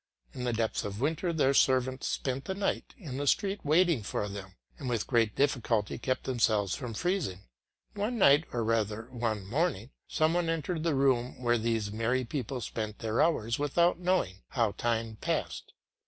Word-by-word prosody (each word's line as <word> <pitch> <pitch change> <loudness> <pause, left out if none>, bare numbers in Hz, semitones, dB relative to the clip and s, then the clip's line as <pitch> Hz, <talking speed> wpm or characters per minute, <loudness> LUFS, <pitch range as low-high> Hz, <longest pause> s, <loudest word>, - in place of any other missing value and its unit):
In 125 - -4
the 120 - +1
depths 115 -1 -1
of 100 0 -5
winter 160 +6 0
their 145 -4 +2
servants 130 -1 +2
spent 135 0 -2
the 190 - -3
night 200 0 -2
in 145 - -6
the 145 0 -2
street 200 +7 +2
waiting 160 -2 +3
for 105 0 -2
them, 100 -2 -8 0.2
and 135 -4 -4
with 115 -4 0
great 115 -4 +2
difficulty 120 -7 +1
kept 130 +1 -1
themselves 110 -6 +1
from 125 -5 -5
freezing. 175 - -1 0.5
One 210 +4 -2
night, 150 -5 +6
or 120 -1 -1
rather 110 +1 -1
one 115 -5 -2
morning, 130 - -1 0.2
some 155 +1 +2
one 175 -1 +1
entered 165 +1 -1
the 165 -2 +1
room 130 -3 +1
where 120 -1 +2
these 110 -2 -1
merry 115 +4 0
people 125 0 -4
spent 110 -1 -4
their 110 0 0
hours 115 -8 +1
without 170 +5 +2
knowing 175 - 0
how 115 -5 +1
time 115 0 -2
passed. - - -3
125 Hz, 175 wpm, -30 LUFS, 110-155 Hz, 0.5 s, night